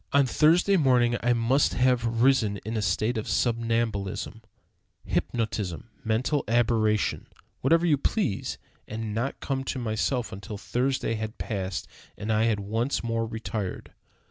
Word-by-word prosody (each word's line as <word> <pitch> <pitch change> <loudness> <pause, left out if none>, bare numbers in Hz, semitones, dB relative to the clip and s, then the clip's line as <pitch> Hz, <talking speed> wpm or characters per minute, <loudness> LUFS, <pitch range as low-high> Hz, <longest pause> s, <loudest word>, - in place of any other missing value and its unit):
On 140 -1 +5
Thursday 170 +9 +4
morning 125 -5 +3
I 120 +1 +3
must 120 +4 +2
have 120 -2 +2
risen 125 -7 +3
in 110 +1 -3
a 110 - 0
state 110 +5 0
of 110 - -6
somnambulism, 115 -3 -1 0.6
hypnotism, 110 -3 -2
mental 125 +6 +1
aberration, 110 -2 +1 0.3
whatever 165 +6 +3
you 150 -5 +3
please, 100 - -1 0.3
and 110 -1 -4
not 120 +5 -2
come 135 -1 -2
to - - -2
myself 120 +1 -1
until 100 +2 -7
Thursday 125 +2 -1
had 110 0 -4
passed, 95 -4 -3 0.3
and 110 +2 -1
I 110 +1 +3
had 110 -3 +1
once 115 +7 -1
more 115 -1 -1
retired. 110 -3 -5
115 Hz, 140 wpm, -27 LUFS, 110-130 Hz, 0.6 s, On